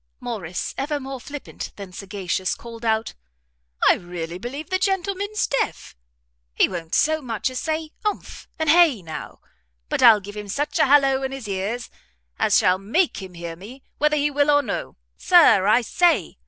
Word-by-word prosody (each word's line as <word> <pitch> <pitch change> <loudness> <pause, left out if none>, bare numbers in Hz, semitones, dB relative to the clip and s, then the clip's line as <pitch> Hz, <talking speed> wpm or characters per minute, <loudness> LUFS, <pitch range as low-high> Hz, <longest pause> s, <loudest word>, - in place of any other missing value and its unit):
Morrice, 185 -7 -4
ever 290 +2 -1
more 270 -1 -6
flippant 290 +1 -8
than 195 -3 -9
sagacious, 190 -1 -3
called 230 -1 -11
out, 220 0 0 0.7
"I - - +8
really 175 -1 -6
believe 280 - -7
the 370 - +1
gentleman's 395 +2 -1
deaf! 275 - -2 0.6
he - - +4
won't 170 -3 -4
so 315 +1 +2
much 240 -1 -2
as 255 - -4
say 315 -1 -3
umph, 420 -1 -4
and 315 0 -2
hay, 300 - +5
now; 160 -1 -8 0.5
but - - -1
I'll 220 -3 +8
give 205 +1 -10
him 210 -1 -6
such 290 - -2
a 310 - +5
hallow 270 -1 +4
in 265 0 -3
his 270 -5 -7
ears, 200 +5 -3 0.5
as - - +4
shall 185 +1 +3
make 235 - 0
him 185 -2 -10
hear 170 -1 -6
me, 225 +10 -12 0.2
whether 300 0 +2
he 295 0 +1
will 285 +1 +2
or 290 0 +4
no. 205 - -5 0.2
Sir! 315 - +5
I 220 +4 +5
say!" 345 +9 +1
250 Hz, 175 wpm, -23 LUFS, 195-300 Hz, 0.7 s, I